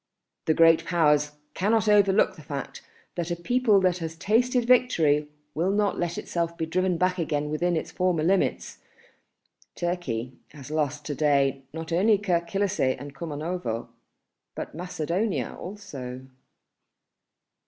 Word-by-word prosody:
The 155 - +2
Great 165 0 +6
Powers 150 -4 +2 0.2
cannot 215 +2 +1
overlook 200 -2 +4
the - - -12
fact 145 -2 -6 0.3
that 175 -1 -3
a 175 - -1
people 225 +3 +3
that 180 -1 +2
has 160 -1 -5
tasted 240 +7 +2
victory 165 - +3 0.3
will 170 +5 0
not 205 0 +1
let 175 -1 -2
itself 170 -1 -3
be 160 - -1
driven 180 +2 0
back 185 +1 +1
again 150 -2 -1
within 175 +2 +1
its - - -4
former 180 -4 0
limits. 190 +3 0 1.0
Turkey 135 -9 -3 0.2
has 145 -1 -10
lost 150 -2 -1
to 145 - -3
day 140 -2 +1
not 160 +1 -5
only 205 +5 +4
Kirk 175 -4 -1
Kilisseh 195 -9 +1
and 145 0 -8
Kumanovo, 150 -4 -4 0.7
but - - -6
Macedonia 180 +4 -2
also." 140 -11 -8
170 Hz, 135 wpm, -26 LUFS, 150-190 Hz, 1.0 s, Great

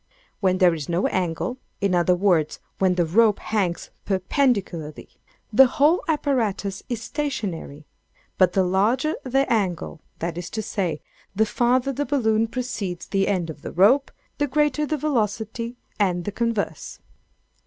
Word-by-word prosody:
When 185 -2 +2
there 180 -2 +5
is 155 -2 -5
no 170 +2 +1
angle—in 190 +3 -2
other 180 0 +3
words, 175 -5 +1 0.2
when 185 -1 +3
the 175 -1 +2
rope 210 +5 +4
hangs 190 -6 -2
perpendicularly, 190 - -1 0.4
the 265 +4 +8
whole 295 +7 +3
apparatus 230 - 0
is 230 -2 -3
stationary; 200 - -4 0.5
but 185 -1 +4
the 190 - +3
larger 220 - +1
the 270 +1 +1
angle, 180 -6 -2 0.2
that 170 0 -3
is 175 - -6
to 220 - -1
say, 185 -8 -2 0.3
the 220 +2 +3
farther 245 +4 +1
the 290 +1 -2
balloon 225 -5 +2
precedes 220 -7 -4
the 195 -1 0
end 175 -5 0
of 150 - -13
the - - -6
rope, 225 +10 +4 0.3
the 290 - +2
greater 295 +1 +1
the 310 - -1
velocity; 230 -3 -2 0.2
and 180 -4 +1
the 205 - -2
converse. 230 -1 -2
205 Hz, 145 wpm, -23 LUFS, 180-250 Hz, 0.5 s, the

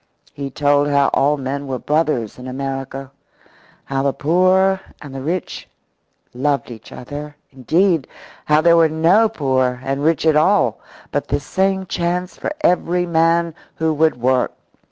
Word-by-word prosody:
He 140 -1 -5
told 145 +1 +2
how 140 -1 +3
all 145 +2 +2
men 140 +1 -4
were 130 -1 -3
brothers 150 -7 -1
in 125 - -8
America, 135 0 -5 0.7
how 135 0 -2
the 140 0 0
poor 185 +4 +2 0.2
and 145 -3 -10
the 135 - -6
rich 165 +5 -4 0.6
loved 140 +1 -1
each 110 -2 -12
other 145 +3 -8 0.2
indeed, 160 - +1 0.4
how 150 +1 +3
there 170 0 +5
were 165 -1 +5
no 170 +8 +3
poor 130 - 0
and 135 +1 -2
rich 160 -1 +1
at 160 -1 +4
all, 185 +7 +3 0.3
but - - -2
the - - 0
same 190 0 -1
chance 180 +1 -2
for - - -4
every 180 - +1
man 165 0 +2 0.2
who 160 -1 0
would 155 -4 +1
work. 130 +1 +1
150 Hz, 155 wpm, -19 LUFS, 135-170 Hz, 0.7 s, there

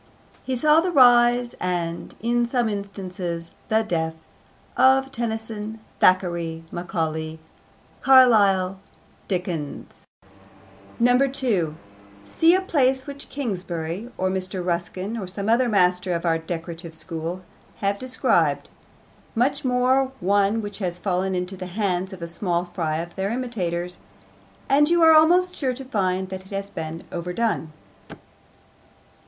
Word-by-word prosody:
He 260 - -2
saw 300 +5 +4
the 365 - -1
rise, 245 -3 +5
and, 170 -2 -3
in 240 +1 +1
some 240 -1 +1
instances, 185 -4 -5 0.2
the 220 0 +3
death, 160 -5 -1 0.6
of 265 +1 +4
Tennyson, 220 -2 -4 0.2
Thackeray, 170 -3 +2
Macaulay, 160 -3 -3 0.6
Carlyle, 200 -8 +5 0.5
Dickens. 175 -6 -4 1.0
2. 245 - +2 0.5
See 330 - +4
a 375 - +2
place 265 -7 +1
which 280 0 -8
Kingsley, 190 - -4
or 185 0 0
Mr. 185 -1 -3
Ruskin, 185 +4 -2
or 190 - -5
some 200 +2 -5
other 240 +2 +3
master 180 -3 +2
of 170 - -3
our 165 -1 +2
decorative 165 0 -6
school, 165 +2 -5 0.3
have 200 0 -1
described 255 0 +1 0.7
much 265 +4 +1
more 255 +1 +2
one 200 +3 +2
which 205 0 -6
has 180 -3 -2
fallen 185 0 -1
into 180 +1 -3
the 185 -1 -7
hands 190 -1 -1
of 190 - -9
the 170 - -4
small 175 0 -1
fry 165 -3 -2
of 170 +1 -6
their 195 +1 -1
imitators 180 -8 -3 0.7
and 295 +2 +4
you 345 -1 +4
are 320 0 +8
almost 355 +4 +5
sure 260 -6 -2
to 265 +1 -8
find 190 -5 -1
that 190 0 -7
it - - -19
has 200 0 -4
been 160 -1 -6
overdone. 180 -1 -2
195 Hz, 130 wpm, -23 LUFS, 175-245 Hz, 1.0 s, are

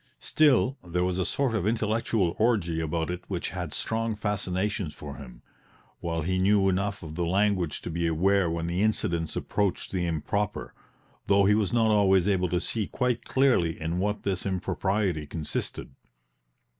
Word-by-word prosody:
Still, 140 -3 +3
there 90 0 -1
was 90 0 -1
a 90 - +1
sort 135 -4 0
of 105 -3 0
intellectual 110 -4 +1
orgie 100 -8 +2
about 80 +1 -1
it 90 0 -4
which 90 -4 -3
had 90 -5 -5
strong 115 -1 -2
fascinations 100 -3 -2
for 70 -1 -8
him, 60 -4 -12 0.6
while 80 -2 -2
he 95 +3 0
knew 100 +1 +4
enough 100 +1 -1
of 80 -2 -7
the 85 +2 -2
language 95 -1 +1
to - - -4
be 85 +1 0
aware 95 +3 +2
when 85 0 -2
the 85 +3 -1
incidents 85 -7 0
approached 100 -3 -1
the 90 -2 -1
improper, 100 +6 -2 0.5
though 100 0 +4
he 105 - +5
was 105 -3 +1
not 115 -2 +3
always 95 -3 +4
able 90 -3 +1
to 90 - +1
see 110 +2 -2
quite 125 -2 -1
clearly 125 -12 +2
in 80 +2 -2
what 105 +2 -1
this 95 -3 -1
impropriety 95 -3 -1
consisted. 75 -2 -4
95 Hz, 170 wpm, -27 LUFS, 85-105 Hz, 0.6 s, he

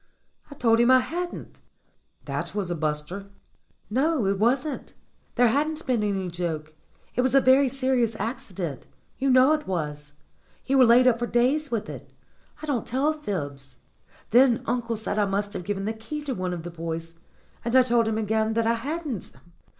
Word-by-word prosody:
"I 285 - -10
told 230 -3 +3
him 240 +1 +4
I 260 - +8
hadn't." 345 +7 -5 0.7
"That - - -4
was 195 -4 -2
a - - -1
buster." 155 +5 -3 0.6
"No, 270 +2 +1
it 195 0 0
wasn't. 260 +6 0 0.4
There 245 -1 +5
hadn't 305 +5 -1
been 250 -4 +1
any 195 -3 -1
joke. 165 -3 -4 0.4
It 250 - +1
was 260 +1 +1
a - - +8
very 265 +1 +5
serious 255 -4 0
accident. 185 - -5 0.3
You 270 +1 +1
know 260 +3 +6
it 305 -1 -2
was. 150 -5 -4 0.5
You 270 0 +2
were 255 - +7
laid 240 +2 +6
up 240 -2 +4
for 240 - -1
days 270 +6 +1
with 225 -2 -2
it. - - -9 0.5
I - - -2
don't 280 -6 -2
tell 275 +5 +1
fibs. 145 - -5 0.6
Then 245 0 +5
uncle 235 -2 -1
said 215 -1 -2
I 205 - +3
must 200 +1 -2
have 180 - -5
given 195 0 -2
the 220 - -1
key 225 +8 -6
to 280 -3 -3
one 185 -4 -3
of 165 - -7
the 175 - -6
boys, 165 0 -5 0.5
and 235 +2 -1
I 260 - +8
told 235 -2 +2
him 220 -1 0
again 220 0 0
that 230 0 +1
I 230 - +3
hadn't." 280 - -4
230 Hz, 185 wpm, -25 LUFS, 190-260 Hz, 0.7 s, I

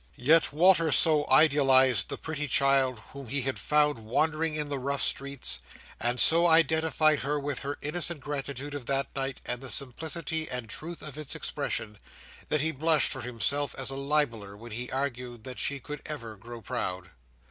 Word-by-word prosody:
Yet 155 +3 +3
Walter 165 +1 +4
so 150 -2 +5
idealised 130 - +4
the - - -4
pretty 150 -2 -4
child 135 -4 +2
whom 140 -2 -9
he 135 +3 0
had 135 0 -2
found 150 -3 +2
wandering 155 +8 -1
in 150 -1 -3
the 140 -1 -4
rough 140 +2 -2
streets, 140 - -1 0.4
and 120 +2 +1
so 170 +2 +7
identified 160 -1 +3
her 145 +2 -2
with 140 -2 -3
her 140 +1 -5
innocent 170 +1 -1
gratitude 140 0 -5
of 145 -4 -7
that 135 0 -1
night 135 -1 -3
and 125 0 -3
the 135 - -6
simplicity 160 +6 -2
and 125 -3 -4
truth 165 +10 -7
of 150 -1 -8
its 150 - -6
expression, 105 -2 -4 0.5
that 150 - +1
he 160 +1 0
blushed 155 +1 +2
for 130 - -4
himself 125 +4 -2
as 135 0 -1
a - - -5
libeller 135 -8 -1
when 120 +2 -11
he 120 +3 -4
argued 125 -4 -4
that 130 0 -7
she 140 -1 -1
could 150 +2 -8
ever 115 -8 -6
grow 115 +3 -11
proud. 90 -2 -4
140 Hz, 180 wpm, -28 LUFS, 125-150 Hz, 0.5 s, so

